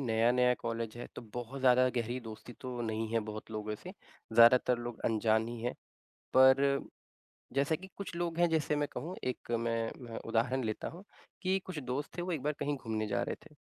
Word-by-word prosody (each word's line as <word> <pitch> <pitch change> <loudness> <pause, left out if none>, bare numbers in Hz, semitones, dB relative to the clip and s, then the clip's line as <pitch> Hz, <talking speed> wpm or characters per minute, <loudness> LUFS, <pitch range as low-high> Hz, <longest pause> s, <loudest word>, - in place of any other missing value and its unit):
नया-नया 125 +1 +3
कॉलेज 115 0 -3
है, 120 - -6
तो - - -7
बहुत 125 +3 -5
ज़्यादा 130 0 +6
गहरी 120 +2 -1
दोस्ती 115 +1 -9
तो 125 -2 -5
नहीं 110 0 -2
है, 115 - +3
बहुत 110 +1 -7
लोगों 105 -1 -3
से, 185 - -7 0.4
ज़्यादातर 120 +1 +7
लोग 120 -1 -6
अनजान 110 0 +2
ही 120 -1 -6
हैं। 120 - -1 0.6
पर, 135 +1 +6 0.7
जैसा 140 +3 +2
कि 190 +4 -10
कुछ 200 -3 -5
लोग 170 -1 -2
हैं 175 - +6
जैसे 155 -2 +1
मैं 145 0 +1
कहूँ, 165 +9 -5
एक 125 -1 -3
मैं 115 -1 0
मैं, 115 -2 -7
उदाहरण 120 +3 0
लेता 110 -1 -2
हूँ 175 +4 -11 0.4
कि 190 0 +2
कुछ 180 -5 -4
दोस्त 130 +5 -4
थे, - - -1
वो 180 +1 -2
एक 155 -6 -1
बार 150 - +1
कहीं 145 0 0
घूमने 110 -3 -2
जा 100 - 0
रहे - - -2
थे - - -16
125 Hz, 200 wpm, -33 LUFS, 115-140 Hz, 0.7 s, ज़्यादातर